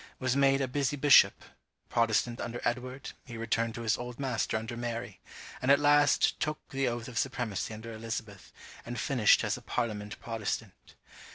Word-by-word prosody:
was 130 -1 0
made 135 0 +4
a 135 - 0
busy 140 +2 -1
bishop; 145 0 +6 0.4
Protestant 115 +1 +1
under 120 +1 -4
Edward, 125 +2 -3
he 120 -2 -9
returned 115 0 -1
to 115 - -5
his 110 - +1
old 125 0 -7
master 125 -5 -1
under 115 +2 -5
Mary; 115 -4 -5 0.4
and 130 - -1
at 140 - +7
last 145 -1 +4
took 150 -1 -1
the 135 -1 -1
oath 120 -1 -3
of 120 -4 -3
supremacy 120 -7 -2
under 110 +1 -8
Elizabeth, 110 -2 -6 0.3
and 120 0 -5
finished 120 -5 +4
as - - -1
a - - -11
parliament 105 -4 -3
Protestant. 110 -3 -5
120 Hz, 170 wpm, -30 LUFS, 115-135 Hz, 0.4 s, at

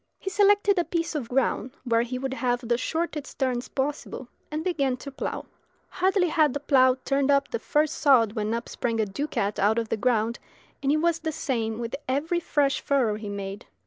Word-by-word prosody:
He 385 - -5
selected 405 -1 +4
a - - +3
piece 335 -1 -2
of 270 -7 -4
ground 260 0 0
where 230 -2 +2
he 245 +2 -3
would 265 +1 -3
have 245 -2 0
the 240 - +3
shortest 310 +3 -3
turns 255 -2 -1
possible, 270 -2 -4 0.2
and 310 +1 -3
began 280 -8 0
to 280 +2 -8
plough. 270 - -4 0.4
Hardly 370 -1 +2
had 310 -4 +3
the - - -1
plough 260 -3 +4
turned 275 0 +1
up 280 0 +3
the 470 - -2
first 305 0 +1
sod 240 -7 +5
when 215 -1 -2
up 235 - -4
sprang 230 -2 -2
a 220 - +2
ducat 205 -2 -2
out 210 +3 +3
of 230 -1 -1
the - - 0
ground, 230 -1 +1 0.4
and 275 - +1
it 305 - +3
was 335 +1 +1
the 320 - -2
same 230 -8 -2
with 230 -1 -4
every 300 +7 0
fresh 285 -5 +1
furrow 260 -6 +2
he 210 0 -6
made. 200 0 -6
270 Hz, 205 wpm, -26 LUFS, 235-310 Hz, 0.4 s, sod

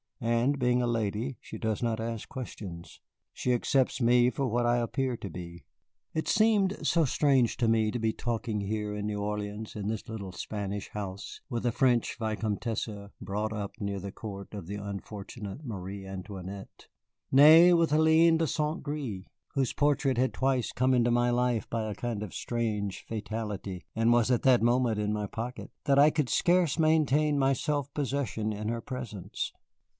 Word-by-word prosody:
And 120 +5 +1
being 125 -1 +2
a - - +1
lady, 115 +2 -1
she - - -8
does 110 -2 -2
not 115 -2 0
ask 115 -1 -4
questions. 100 -9 -8 0.3
She 125 - 0
accepts 130 +2 +1
me 120 +1 +5
for 135 +1 -1
what 120 +1 +1
I 120 0 +3
appear 120 +1 -1
to 100 - -6
be." 85 0 -8 0.5
It 160 - -2
seemed 210 -2 +3
so 165 -2 +3
strange 135 -3 +2
to 120 - +1
me 110 -1 +3
to 120 - -2
be 110 -1 +1
talking 115 -3 -2
here 105 +1 -2
in 105 0 -3
New 105 -1 -2
Orleans, 105 +1 -4
in 105 -2 -4
this 110 -1 -3
little 100 -4 -6
Spanish 100 +2 -4
house, 100 -2 -6
with 120 -1 -3
a - - +2
French 125 +1 +2
vicomtesse 110 0 -2 0.3
brought 105 +2 -3
up 105 -2 -4
near 100 -1 -2
the 100 +1 -6
court 100 -1 -8
of 100 -5 -7
the 100 - -4
unfortunate 100 +4 -7
Marie 100 -3 -6
Antoinette; 95 0 -8 0.4
nay, 160 +6 +8
with 170 -1 +3
Hélène 160 +2 +5
de 165 - +2
St. 150 +1 -1
Gré, 135 -11 -4 0.3
whose 135 -3 0
portrait 145 -3 +2
had 130 +1 +2
twice 130 -2 0
come 130 +1 +2
into 120 -1 +3
my 120 0 +3
life 120 -3 +1
by 115 -1 -1
a 105 -1 -4
kind 115 -4 -3
of 105 - -7
strange 105 -5 -2
fatality 105 -4 -4
(and 115 +1 +3
was 120 0 +3
at 125 -2 +2
that 125 -4 +5
moment 120 -2 +2
in 105 0 0
my 105 -1 -2
pocket), 120 +4 -6
that 140 -1 +4
I 145 +2 +8
could 150 -5 0
scarce 175 +2 +3
maintain 155 -2 +3
my 135 0 +3
self 145 0 -1
possession 130 -6 -1
in 105 0 -4
her 115 +1 -2
presence. 120 -7 -5
115 Hz, 180 wpm, -29 LUFS, 105-135 Hz, 0.5 s, nay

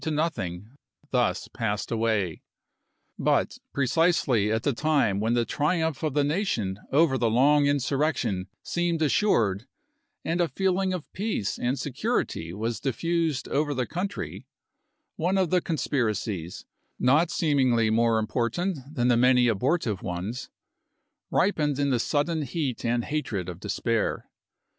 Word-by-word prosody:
xiv 160 - -2
nothing 105 - -2 0.4
thus 125 -2 +1
passed 110 -4 -3
away; 110 -7 0 0.8
but - - +1
precisely 140 - +2
at 110 0 0
the 145 - +1
time 140 -8 +1
when 115 +3 +1
the 120 -1 +2
triumph 160 +5 0
of 155 -3 -2
the 145 - +3
nation 140 - -1
over 140 -2 +3
the 115 -1 +2
long 140 +5 +4
insurrection 140 -8 0 0.2
seemed 175 -1 -1
assured, 120 - +2 0.6
and 170 +2 0
a 170 - +3
feeling 190 +1 0
of 180 -4 -3
peace 195 - -2
and 125 +3 0
security 135 - -2
was 110 +5 -3
diffused 160 +2 -1
over 145 0 0
the 125 -1 0
country, 180 - -5 0.7
one 180 +4 +1
of 185 -4 +1
the 180 -1 +3
conspiracies, 110 - -2 0.3
not 150 +7 +3
seemingly 130 -9 +2
more 115 0 +3
important 125 - -1 0.2
than 120 -1 +1
the 120 - +4
many 125 +1 +5
abortive 115 - 0
ones, 100 +8 -4 0.8
ripened 150 -7 +1
in 140 -1 +1
the 125 - +2
sudden 155 +6 0
heat 140 -2 -3
of 120 0 +1
hatred 115 - -3
and 90 -1 -7
despair. 110 +2 -1
130 Hz, 135 wpm, -26 LUFS, 115-160 Hz, 0.8 s, many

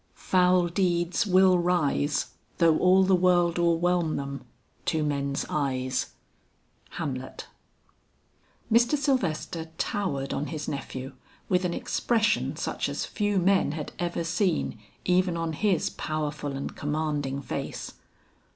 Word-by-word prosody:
"Foul 180 -1 +3
deeds 175 +2 +1
will 185 -1 +5
rise, 155 -4 +1 0.2
Though 165 -2 +4
all 185 +1 +5
the 190 0 +4
world 175 -1 +3
o'erwhelm 170 -1 +2
them, 140 0 -5 0.4
to 160 -1 +1
men's 140 -1 -1
eyes." 130 -3 -1 0.8
HAMLET. 130 -6 -5 1.3
Mr. 235 +6 +4
Sylvester 190 - -1
towered 140 -11 -2
on 150 - -2
his 155 -2 -5
nephew 135 -1 -5 0.4
with 180 -1 +2
an 170 - -1
expression 220 -3 +1
such - - -2
as - - -3
few 205 -2 -1
men 190 -4 +3
had 155 -2 -5
ever 175 -1 -1
seen 170 - 0 0.3
even 180 -1 +2
on 165 -1 -2
his 190 +1 +1
powerful 150 -2 -3
and 135 +1 -5
commanding 145 -2 -2
face. 130 - -5
170 Hz, 120 wpm, -27 LUFS, 145-185 Hz, 1.3 s, will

